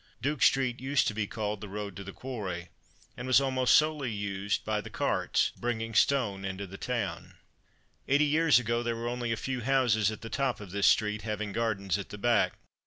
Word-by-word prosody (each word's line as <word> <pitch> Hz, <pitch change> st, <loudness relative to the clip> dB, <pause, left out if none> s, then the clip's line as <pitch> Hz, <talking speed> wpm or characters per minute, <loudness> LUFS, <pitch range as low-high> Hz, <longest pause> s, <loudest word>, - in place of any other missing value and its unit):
Duke 145 Hz, +2 st, -2 dB
street 130 Hz, -3 st, +3 dB
used 135 Hz, +2 st, +1 dB
to -, -, -4 dB
be 105 Hz, -1 st, -2 dB
called 105 Hz, -2 st, -3 dB
"The 105 Hz, -, -7 dB
road 100 Hz, -1 st, -5 dB
to 100 Hz, -, -6 dB
the 100 Hz, -, -8 dB
Quarry," 95 Hz, -9 st, -5 dB, 0.5 s
and 125 Hz, -, -6 dB
was 130 Hz, 0 st, +6 dB
almost 130 Hz, -2 st, +3 dB
solely 150 Hz, -5 st, +2 dB
used 100 Hz, -1 st, -2 dB
by 105 Hz, -1 st, 0 dB
the -, -, -9 dB
carts -, -, 0 dB
bringing 115 Hz, -1 st, -3 dB
stone 105 Hz, -6 st, +2 dB
into 95 Hz, +1 st, -4 dB
the 95 Hz, +1 st, -10 dB
town. 100 Hz, -9 st, -3 dB, 0.7 s
Eighty 145 Hz, +2 st, +4 dB
years 155 Hz, -2 st, +4 dB
ago, 120 Hz, -1 st, 0 dB
there 120 Hz, -1 st, -1 dB
were 115 Hz, +1 st, -4 dB
only 120 Hz, -1 st, -2 dB
a 115 Hz, -, 0 dB
few 130 Hz, -2 st, -3 dB
houses 120 Hz, -5 st, +3 dB
at 110 Hz, -, -6 dB
the 115 Hz, -, -6 dB
top 135 Hz, 0 st, 0 dB
of 100 Hz, -4 st, -9 dB
this 100 Hz, +1 st, +2 dB
street, 105 Hz, 0 st, +3 dB
having 105 Hz, -1 st, -3 dB
gardens 100 Hz, -4 st, -1 dB
at 100 Hz, -, -7 dB
the 105 Hz, -, -7 dB
back. 115 Hz, 0 st, +2 dB
115 Hz, 205 wpm, -29 LUFS, 100-125 Hz, 0.7 s, was